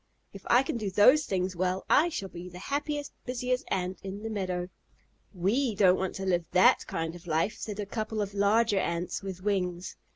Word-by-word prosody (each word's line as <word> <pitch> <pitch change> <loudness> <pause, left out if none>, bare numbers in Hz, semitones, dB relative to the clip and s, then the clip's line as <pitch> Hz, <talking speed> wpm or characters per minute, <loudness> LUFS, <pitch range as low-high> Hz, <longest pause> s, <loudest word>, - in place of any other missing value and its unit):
If 195 - -10
I 245 +2 +5
can 255 - -3
do 210 -3 -2
those 255 +10 +5
things 185 -1 -1
well, 185 +2 -1
I 330 +4 +4
shall 200 - -4
be 180 0 -9
the 180 - -11
happiest, 290 +7 -3
busiest 250 0 -2
Ant 185 0 -2
in 195 +2 -7
the 225 - -4
meadow." 185 -3 -2 0.6
"We 215 +6 0
don't 190 -3 +5
want 190 -1 -2
to 190 - -4
live 175 -3 +1
that 185 0 +5
kind 165 0 -3
of 175 0 -13
life," 165 +6 0
said 210 -1 -5
a 205 - -2
couple 215 +1 -4
of 200 -1 -2
larger 205 +1 +3
Ants 170 0 -2
with 190 -2 -7
wings. 180 -3 -2
195 Hz, 200 wpm, -29 LUFS, 180-220 Hz, 0.6 s, I